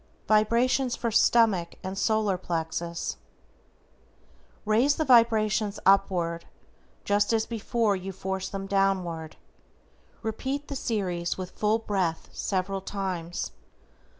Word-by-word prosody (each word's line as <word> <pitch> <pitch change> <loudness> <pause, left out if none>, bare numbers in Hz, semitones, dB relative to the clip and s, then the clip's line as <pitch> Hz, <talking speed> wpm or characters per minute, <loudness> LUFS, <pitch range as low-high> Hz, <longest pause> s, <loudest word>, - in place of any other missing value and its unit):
=VIBRATIONS 235 +4 +3
FOR 235 - -2
STOMACH 215 -6 +3
and 190 +1 -4
SOLAR 215 -1 +1
PLEXUS:= 170 -1 -3 1.5
Raise 235 +7 +3
the 315 - -1
vibrations 220 -4 +3
upward, 180 -4 +2 0.6
just 205 +1 +2
as 220 0 +2
before 225 -1 0
you 190 +1 -5
forced 190 0 -4
them 195 -1 -4
downward. 190 -5 0 0.9
Repeat 270 +6 -3
the 280 - -4
series 185 -9 -2
with 185 -1 -6
full 215 +1 +1
breath 190 -7 -2
several 195 0 -2
times. 185 -4 -4
200 Hz, 105 wpm, -27 LUFS, 185-225 Hz, 1.5 s, =VIBRATIONS